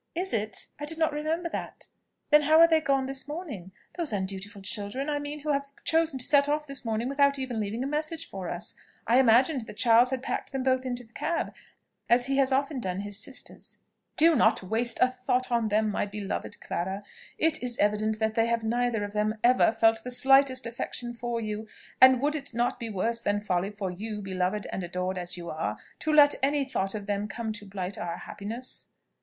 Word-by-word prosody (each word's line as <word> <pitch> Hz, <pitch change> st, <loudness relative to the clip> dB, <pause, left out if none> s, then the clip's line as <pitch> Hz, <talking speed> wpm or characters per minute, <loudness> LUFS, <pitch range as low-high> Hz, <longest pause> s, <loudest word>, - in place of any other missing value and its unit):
"Is 365 Hz, +2 st, -1 dB
it? 215 Hz, -2 st, -2 dB
I 295 Hz, -, -4 dB
did 320 Hz, +2 st, -1 dB
not 320 Hz, -1 st, +1 dB
remember 315 Hz, +3 st, -1 dB
that. -, -, -6 dB, 0.5 s
Then 300 Hz, 0 st, +7 dB
how 310 Hz, +2 st, +5 dB
are 335 Hz, -, +9 dB
they 320 Hz, -1 st, +3 dB
gone 275 Hz, -3 st, +1 dB
this 270 Hz, +1 st, -2 dB
morning? 290 Hz, -, -6 dB, 0.2 s
those 335 Hz, -7 st, -2 dB
undutiful 195 Hz, +1 st, -4 dB
children, 210 Hz, +9 st, -1 dB
I 290 Hz, -, 0 dB
mean, 290 Hz, +1 st, -5 dB
who 300 Hz, +1 st, -1 dB
have 280 Hz, 0 st, 0 dB, 0.2 s
chosen 325 Hz, -3 st, +2 dB
to 250 Hz, -, -1 dB
set 285 Hz, -1 st, +4 dB
off 300 Hz, +1 st, 0 dB
this 275 Hz, -2 st, -5 dB
morning 225 Hz, +1 st, -1 dB
without 280 Hz, +1 st, +3 dB
even 260 Hz, -4 st, -3 dB
leaving 215 Hz, +4 st, -2 dB
a -, -, -2 dB
message 310 Hz, +3 st, -2 dB
for 190 Hz, -3 st, -6 dB
us. 175 Hz, -, -5 dB, 0.3 s
I 240 Hz, +3 st, +4 dB
imagined 255 Hz, +1 st, +4 dB
that -, -, -10 dB
Charles 240 Hz, +1 st, +5 dB
had 260 Hz, -1 st, -3 dB
packed -, -, -3 dB
them 265 Hz, -1 st, -1 dB
both 260 Hz, 0 st, +1 dB
into 245 Hz, -1 st, -3 dB
the 230 Hz, 0 st, -23 dB
cab, 335 Hz, +1 st, -2 dB, 0.6 s
as 245 Hz, +1 st, +5 dB
he 270 Hz, +1 st, 0 dB
has 270 Hz, -1 st, +3 dB
often 275 Hz, +1 st, 0 dB
done 185 Hz, -4 st, -3 dB
his 205 Hz, 0 st, -6 dB
sisters." 265 Hz, +4 st, -7 dB, 0.4 s
"Do 325 Hz, +1 st, +6 dB
not -, -, +3 dB
waste 225 Hz, +5 st, -1 dB
a -, -, +6 dB
thought 255 Hz, 0 st, -1 dB
on 235 Hz, -2 st, +2 dB
them, 215 Hz, 0 st, +1 dB
my 205 Hz, -, -1 dB
beloved 200 Hz, -1 st, -5 dB
Clara! 190 Hz, +4 st, -3 dB, 0.3 s
It 320 Hz, 0 st, +2 dB
is 245 Hz, -1 st, -3 dB
evident 210 Hz, +1 st, +1 dB
that 220 Hz, 0 st, 0 dB
they 225 Hz, 0 st, +2 dB
have 230 Hz, -1 st, 0 dB
neither 235 Hz, -1 st, 0 dB
of 205 Hz, 0 st, -5 dB
them 210 Hz, +1 st, 0 dB
ever 245 Hz, -2 st, +5 dB
felt 225 Hz, 0 st, +3 dB
the 250 Hz, -, -5 dB
slightest 265 Hz, +1 st, +4 dB
affection 240 Hz, +1 st, -4 dB
for 240 Hz, 0 st, -3 dB
you; 215 Hz, 0 st, -4 dB, 0.3 s
and 260 Hz, -1 st, +8 dB
would 295 Hz, +1 st, +1 dB
it 280 Hz, -5 st, -6 dB
not 240 Hz, +1 st, 0 dB
be 230 Hz, -2 st, -4 dB
worse 225 Hz, +4 st, -1 dB
than 205 Hz, -2 st, 0 dB
folly 190 Hz, -2 st, -1 dB
for 200 Hz, -3 st, -4 dB
you, 210 Hz, +3 st, -5 dB
beloved 190 Hz, +2 st, -1 dB
and 190 Hz, -, -3 dB
adored 180 Hz, +1 st, -3 dB
as 180 Hz, 0 st, -3 dB
you 170 Hz, -1 st, -6 dB
are, 105 Hz, -10 st, -3 dB, 0.2 s
to 310 Hz, -, -1 dB
let 295 Hz, -1 st, +7 dB
any 280 Hz, +1 st, +2 dB
thought 195 Hz, -6 st, -2 dB
of 205 Hz, -1 st, -5 dB
them 205 Hz, 0 st, -2 dB
come 225 Hz, 0 st, -4 dB
to 210 Hz, -1 st, -8 dB
blight 190 Hz, -1 st, -5 dB
our 170 Hz, 0 st, -4 dB
happiness?" 230 Hz, +5 st, -6 dB
240 Hz, 215 wpm, -28 LUFS, 205-275 Hz, 0.6 s, are